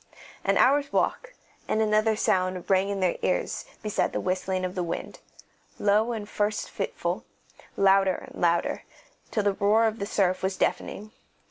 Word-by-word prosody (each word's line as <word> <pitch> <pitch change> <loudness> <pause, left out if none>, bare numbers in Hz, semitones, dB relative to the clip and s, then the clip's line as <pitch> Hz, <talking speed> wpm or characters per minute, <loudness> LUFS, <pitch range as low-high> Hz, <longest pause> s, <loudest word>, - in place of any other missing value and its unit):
An - - +2
hour's 280 +2 +4
walk, - - 0 0.3
and 215 - 0
another 215 0 +3
sound 185 -3 0
rang 190 +1 +3
in 200 -1 -2
their 180 -2 +1
ears - - -1 0.2
beside 210 -1 0
the - - -1
whistling 185 0 -1
of 180 - -4
the 185 - -2
wind, 170 - -5 0.6
low 210 +3 +2
at 210 -2 -5
first 210 +1 -1
and - - -15
fitful, - - -3 0.5
louder 195 -1 +4
and - - -10
louder, 170 -1 +1 0.5
till 215 - 0
the 200 -1 +2
roar 210 +3 +3
of 220 0 -1
the 200 - -3
surf 185 -3 +1
was 190 0 -1
deafening. 215 +2 -2
200 Hz, 165 wpm, -26 LUFS, 185-215 Hz, 0.6 s, hour's